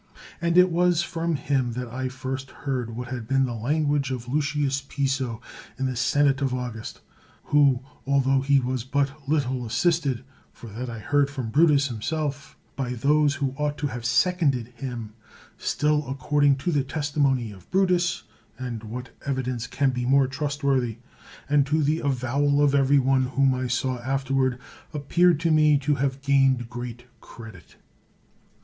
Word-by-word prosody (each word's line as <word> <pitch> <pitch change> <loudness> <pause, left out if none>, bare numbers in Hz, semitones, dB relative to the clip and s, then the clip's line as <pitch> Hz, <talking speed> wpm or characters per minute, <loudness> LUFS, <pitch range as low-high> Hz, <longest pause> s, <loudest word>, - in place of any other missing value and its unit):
And 170 0 +1
it 180 0 +6
was 175 0 +2
from 165 -1 -2
him 135 -4 -1
that 125 +1 -4
I 130 +2 -4
first 130 +1 -5
heard 125 -6 -4
what 125 +1 -6
had 120 -3 -5
been 135 0 +2
the 120 - -4
language 145 +4 0
of 125 -2 -5
Lucius 140 0 0
Piso, 135 -4 -2 0.4
in 135 - -1
the 130 -1 -1
senate 140 +2 +2
of 135 -2 0
August; 120 -3 -6 0.4
who, 140 -4 +3 0.3
altho 135 -1 +3
he 140 0 +3
was 130 -1 -2
but 140 +1 -2
little 130 -4 0
assisted 135 +2 0 0.3
(for 115 - -12
that 120 +4 -5
I 115 - -6
heard 145 +5 +1
from 130 -6 -5
Brutus 145 -1 +4
him 110 -2 -6
self) 145 0 -3 0.2
by 125 -2 -2
those 145 +3 +2
who 135 -2 -2
ought 150 0 -1
to 150 - -3
have 120 -2 -6
seconded 130 0 +1
him, 120 -3 -7 0.5
still 150 -2 0
according 140 +1 +2
to 175 - +2
the 145 -4 +1
testimony 140 -5 0
of 95 -3 -15
Brutus 180 -2 +1 0.3
(and 120 -3 -5
what 125 +4 -6 0.2
evidence 130 -3 -2
can 135 -1 +1
be 125 -1 -3
more 135 +1 +5
trustworthy?) 135 -4 -1 0.5
and 145 -1 +4
to 155 +2 +1
the 155 +3 +1
avowal 140 +1 +1
of 140 -1 +3
every 140 0 +4
one 130 -1 +2
whom 135 +1 +2
I 130 0 -2
saw 125 +1 -1
afterward, 130 0 0 0.4
appeared 170 +3 +3
to 165 -1 +2
me 155 -1 +5
to 145 +1 0
have 135 -1 -2
gained 135 -4 +2
great 120 0 -7 0.2
credit. 110 -6 -13
135 Hz, 165 wpm, -25 LUFS, 125-145 Hz, 0.5 s, it